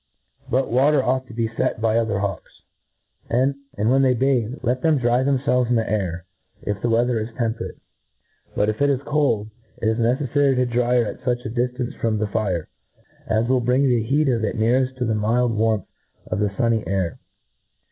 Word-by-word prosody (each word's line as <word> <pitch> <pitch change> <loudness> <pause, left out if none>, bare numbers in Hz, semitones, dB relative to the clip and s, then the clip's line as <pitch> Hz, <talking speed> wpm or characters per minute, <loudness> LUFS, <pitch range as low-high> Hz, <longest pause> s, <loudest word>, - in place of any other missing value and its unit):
But 130 -1 0
water 135 +3 +3
ought 130 +1 0
to - - -11
be 115 -1 0
fet 110 -1 -2
by 110 0 +1
other 115 -3 +1
hawks; 95 -3 -5 0.7
and 130 +4 +2 0.2
when 120 +6 +2
they 130 -2 +3
bathe, 125 -2 +1
let 125 +1 0
them 160 -2 +3
dry 120 -1 +2
themfelves 130 -2 +1
in 125 - +3
the 115 -1 +1
air, 90 -4 -2 0.4
if 105 -1 -3
the 120 - 0
weather 120 +1 +2
is 110 +1 -4
tempe 115 -2 -1
rate. - - -8 0.8
But, 105 - +2
if 110 +3 -2
it 145 - +4
is 135 -3 +1
cold, 135 -8 0 0.3
it 110 - -1
is 110 +1 +1
neceflary 135 +3 +2
to 125 0 +2
dry 120 0 +1
her 120 -2 +3
at - - -6
fuch 125 -1 -1
a 110 - -4
diflance 125 +1 -2
from 110 -2 +1
the 110 - 0
fire, 100 -5 -2 0.6
as 110 +2 +1
will 130 0 +2
bring 125 +3 +2
the 125 -4 +3
heat 140 +7 +1
of 120 -4 +1
it 110 - -2
neareft 125 +4 +1
to 125 - -1
the 110 - 0
mild 115 +2 +1
warmth 110 -2 +1 0.4
of - - -3
the 105 -1 +1
fun 115 +4 0
ny 110 - -5
air. 95 -4 -1
120 Hz, 205 wpm, -22 LUFS, 110-130 Hz, 0.8 s, it